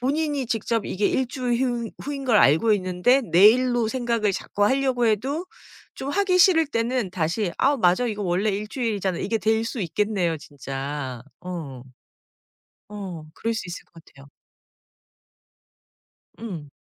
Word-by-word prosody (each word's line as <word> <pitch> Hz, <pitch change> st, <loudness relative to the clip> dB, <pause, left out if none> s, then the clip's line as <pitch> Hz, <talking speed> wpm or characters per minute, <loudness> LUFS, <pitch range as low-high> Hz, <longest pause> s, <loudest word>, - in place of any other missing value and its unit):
본인이 285 Hz, +1 st, -1 dB
직접 225 Hz, -1 st, -1 dB
이게 200 Hz, +2 st, 0 dB
1주일 250 Hz, -2 st, -1 dB
휴 240 Hz, -3 st, -1 dB
후인 280 Hz, -1 st, -5 dB
걸 240 Hz, -4 st, +3 dB
알고 185 Hz, +6 st, +5 dB
있는데 185 Hz, +6 st, +2 dB
내일로 235 Hz, +6 st, +5 dB
생각을 235 Hz, -4 st, 0 dB
자꾸 205 Hz, +2 st, -1 dB
하려고 260 Hz, 0 st, +2 dB
해도 265 Hz, -, 0 dB, 0.5 s
좀 270 Hz, -, -5 dB
하기 370 Hz, +2 st, +2 dB
싫을 345 Hz, -3 st, +5 dB
때는 235 Hz, -5 st, -1 dB
다시 175 Hz, +2 st, -1 dB
'아 280 Hz, +2 st, +3 dB
맞아 185 Hz, +1 st, +3 dB
이거 210 Hz, -3 st, -3 dB
원래 190 Hz, +3 st, +1 dB
1주일이잖아.' 205 Hz, -2 st, -2 dB
이게 225 Hz, +2 st, -1 dB
될 220 Hz, +1 st, +1 dB
수 230 Hz, +1 st, -4 dB
있겠네요 185 Hz, -2 st, 0 dB
진짜. 135 Hz, -3 st, -6 dB, 0.2 s
어. 160 Hz, -8 st, -7 dB, 1.1 s
어 190 Hz, -6 st, -7 dB
그럴 230 Hz, -, -2 dB
수 220 Hz, -, -3 dB
있을 175 Hz, -, -7 dB
것 165 Hz, -, -16 dB
같아요. 140 Hz, 0 st, -17 dB, 2.1 s
음. 175 Hz, -11 st, -7 dB
220 Hz, 265 characters per minute, -24 LUFS, 180-250 Hz, 2.1 s, 알고